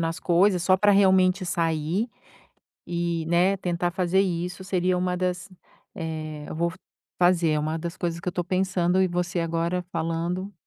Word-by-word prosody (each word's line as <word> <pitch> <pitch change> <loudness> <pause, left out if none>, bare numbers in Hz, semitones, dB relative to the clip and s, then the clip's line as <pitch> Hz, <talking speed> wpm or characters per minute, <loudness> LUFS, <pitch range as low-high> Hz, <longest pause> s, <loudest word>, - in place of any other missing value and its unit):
nas 165 0 -2
coisas 180 +1 +3
só 185 +1 +4
pra 205 +2 +4
realmente 190 -1 +4
sair, 165 +5 0 0.8
e, 170 -1 -2
né, 180 +3 +3
tentar 175 -1 -1
fazer 185 +1 +2
isso 180 0 -3
seria 185 -1 0
uma 180 0 0
das 180 +1 -2 0.5
eh, 155 -4 -5
eu - - -6
vou 170 +1 0 0.5
fazer, 175 -2 +3
é 150 - +1
uma 155 +2 -2
das 170 +1 -5
coisas 170 -1 -2
que 175 - -10
eu - - +1
tô 175 - -2
pensando 185 0 +1
e 190 - +3
você 175 0 -2
agora 170 +2 -1
falando 170 +4 -2
175 Hz, 170 wpm, -25 LUFS, 170-185 Hz, 0.8 s, só